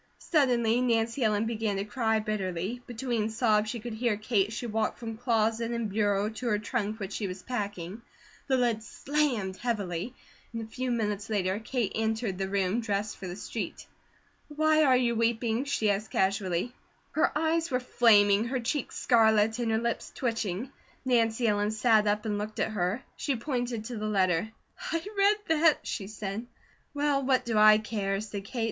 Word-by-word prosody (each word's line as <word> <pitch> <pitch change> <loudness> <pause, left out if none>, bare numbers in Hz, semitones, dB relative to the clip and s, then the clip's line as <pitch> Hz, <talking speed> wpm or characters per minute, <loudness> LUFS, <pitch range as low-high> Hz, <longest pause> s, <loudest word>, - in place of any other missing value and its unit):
Suddenly 245 -6 +2
Nancy 230 +1 +1
Ellen 215 0 +2
began 220 -2 -1
to 195 +1 -2
cry 220 0 0
bitterly; 210 +1 -3
between 235 -2 -2
sobs 220 -2 +2
she 235 - -4
could 235 +1 -6
hear 225 -1 0
Kate 210 -2 +1
as 215 - -8
she 240 - -4
walked 220 -1 -1
from 225 -1 -6
closet 225 -1 +1
and 235 -3 -2
bureau 205 -1 +1
to 225 +3 -5
her 210 -3 +2
trunk 215 0 -2
which 195 0 -5
she 205 - -2
was 185 0 -7
packing. 205 -4 -4 0.5
The 265 -2 +3
lid 235 -3 +1
slammed 240 -7 -1
heavily 210 -1 -3 0.4
and 230 0 -3
a - - -6
few 255 +3 -4
minutes 210 -3 -1
later 195 -2 0
Kate 230 -2 -2
entered 220 -3 -1
the 190 0 -2
room 200 +3 0
dressed 210 -1 -2
for 190 - -7
the 175 - -5
street. - - -5 0.6
"Why 310 +1 +3
are 260 -3 +5
you 240 -2 +2
weeping?" 230 +2 0
she 220 -7 +1
asked 200 +1 -2
casually. 190 +2 0 0.4
Her 315 - +2
eyes 325 +1 +1
were 250 -2 +1
flaming, 210 -4 +4
her 255 +2 -1
cheeks 250 +3 -2
scarlet, 220 -1 +3
and 235 -2 0
her 220 - +2
lips 235 +1 -2
twitching. 230 -1 -2 0.3
Nancy 235 -2 +2
Ellen 205 -1 +2
sat 220 -1 +3
up 210 +1 +1
and 205 -1 -1
looked 215 +1 -5
at - - 0
her. 205 +5 -1
She 280 - -1
pointed 245 -3 -3
to 240 0 -5
the 215 0 -3
letter: 190 -1 +1 0.4
"I 330 +1 -1
read 400 +1 +4 0.2
that," 320 -2 +4
she 195 -5 -4
said. 215 +2 -5 0.4
"Well, 285 -1 +1
what 260 -1 +2
do 230 -2 -1
I 215 0 +8
care?" 205 -3 -2
said 205 -2 -6
Kate. 240 - -6
220 Hz, 180 wpm, -29 LUFS, 205-245 Hz, 0.6 s, I